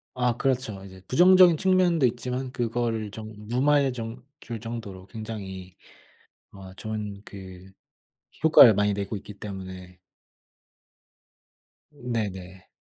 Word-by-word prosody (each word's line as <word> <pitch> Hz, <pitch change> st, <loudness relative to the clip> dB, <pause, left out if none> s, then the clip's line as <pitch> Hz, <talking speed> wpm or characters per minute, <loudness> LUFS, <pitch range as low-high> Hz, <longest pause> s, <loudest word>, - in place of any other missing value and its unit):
아 125 Hz, -2 st, 0 dB
그렇죠. 125 Hz, -8 st, -1 dB
이제 95 Hz, -1 st, -13 dB
부정적인 180 Hz, +2 st, +6 dB
측면도 180 Hz, -4 st, +3 dB
있지만 125 Hz, +2 st, -2 dB
그거를 115 Hz, -3 st, -2 dB
좀 110 Hz, +2 st, -9 dB
무마해 135 Hz, +3 st, +2 dB
좀 115 Hz, 0 st, -7 dB, 0.2 s
줄 115 Hz, -2 st, -6 dB
정도로 105 Hz, -5 st, -7 dB
굉장히 95 Hz, -4 st, -8 dB, 0.8 s
어 95 Hz, -1 st, -11 dB
좋은 105 Hz, -1 st, -6 dB
그 95 Hz, -2 st, -11 dB, 0.7 s
효과를 155 Hz, -7 st, +8 dB
많이 105 Hz, +1 st, +2 dB
내고 100 Hz, +1 st, -3 dB
있기 105 Hz, +1 st, -8 dB
때문에 95 Hz, -3 st, -9 dB, 1.9 s
네네. 100 Hz, -9 st, -5 dB
110 Hz, 230 characters per minute, -26 LUFS, 95-125 Hz, 1.9 s, 효과를